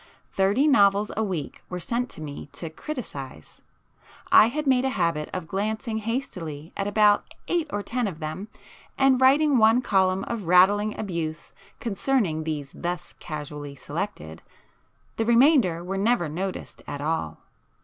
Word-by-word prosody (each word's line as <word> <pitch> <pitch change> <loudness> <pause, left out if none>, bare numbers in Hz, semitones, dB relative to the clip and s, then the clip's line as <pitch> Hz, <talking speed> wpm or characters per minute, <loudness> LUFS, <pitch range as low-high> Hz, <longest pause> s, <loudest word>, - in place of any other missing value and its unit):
Thirty 200 +10 +3
novels 205 -6 +4
a 220 - 0
week 180 -8 -4
were 180 - -4
sent 240 +7 -2
to - - -8
me 145 -2 -7
to 160 +3 -6
'criticise,'—I 235 - -2
made 260 -2 +3
a 265 - +1
habit 170 -9 -1
of 185 -3 -5
glancing 220 +4 -2
hastily 185 - -5
at 195 - -2
about 205 0 +3 0.2
eight 340 -3 0
or 205 - -2
ten 245 0 -1
of 180 -6 -5
them, 160 +5 -5 0.5
and 270 -1 +4
writing 280 +1 +5
one 225 +3 +5
column 190 -3 +2
of 220 -7 -5
rattling 205 +4 +4
abuse 170 -6 -4 0.3
concerning 200 - 0
these 145 -3 -4
thus 175 0 -4
casually 150 -2 -7
selected,—the 80 - -6 0.8
remainder 235 - +4
were 195 +2 -3
never 220 -4 +2
noticed 185 +5 -5
at 145 - -5
all. 145 - -2
195 Hz, 140 wpm, -25 LUFS, 160-235 Hz, 0.8 s, writing